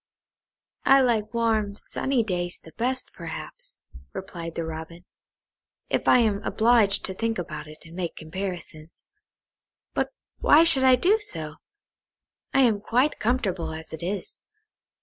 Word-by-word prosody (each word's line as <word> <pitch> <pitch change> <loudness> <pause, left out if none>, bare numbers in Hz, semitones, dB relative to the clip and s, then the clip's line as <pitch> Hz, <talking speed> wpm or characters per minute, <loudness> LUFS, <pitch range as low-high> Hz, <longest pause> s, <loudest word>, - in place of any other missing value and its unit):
"I 270 0 +6
like 225 -4 +1
warm 220 -3 0
sunny 260 +3 -1
days 175 -4 -2
the 160 - -13
best, 255 +3 -2
perhaps," - - -8 0.4
replied 170 -3 -7
the 165 - -2
Robin, 160 +2 -8 0.9
"if - - 0
I - - +7
am 215 -4 +2
obliged 225 -3 +3
to 190 - -2
think 225 +3 -2
about 155 -4 -5
it 155 0 -13
and 165 +1 -12
make 175 -2 -3
comparisons. 170 -2 -7 0.9
But - - -1 0.3
why 305 +3 +6
should 280 -6 +5
I 260 -1 +8
do 380 - +3
so? 155 - -3 0.9
I 270 - +4
am 225 -6 +3
quite 250 +7 +1
comfortable 195 -9 -1
as 160 0 -9
it 160 - -6
is. 190 +4 -5
200 Hz, 140 wpm, -25 LUFS, 170-245 Hz, 0.9 s, I